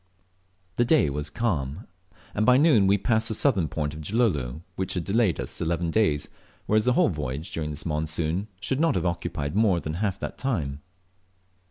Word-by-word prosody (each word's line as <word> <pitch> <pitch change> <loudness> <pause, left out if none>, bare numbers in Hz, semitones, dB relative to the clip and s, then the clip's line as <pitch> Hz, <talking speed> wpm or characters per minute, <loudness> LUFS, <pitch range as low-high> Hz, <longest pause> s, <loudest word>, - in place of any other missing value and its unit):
The 120 - +4
day 125 - +3
was 75 +2 -3
calm, 85 - -2 0.5
and 105 - 0
by 125 +3 +6
noon 135 -10 +5
we 100 +1 +4
passed 110 +2 +1
the 110 - -1
southern 100 - +2
point 75 0 -3
of 75 - -7
Gilolo, 80 - 0
which 95 +1 -2
had 90 - -1
delayed 100 -2 +1
us - - -4
eleven 85 0 0
days, 80 -8 +1 0.4
whereas 110 +1 +2
the 125 - +4
whole - - +4
voyage 75 -2 -4
during 75 -2 -3
this 75 0 -6
monsoon 80 +4 -1
should 130 +7 -2
not 165 -5 +3
have 90 -1 0
occupied 85 -3 -2
more 105 -5 +3
than 75 0 -4
half 95 +2 -1
that - - -6
time. 75 - -2
90 Hz, 185 wpm, -26 LUFS, 75-110 Hz, 0.5 s, by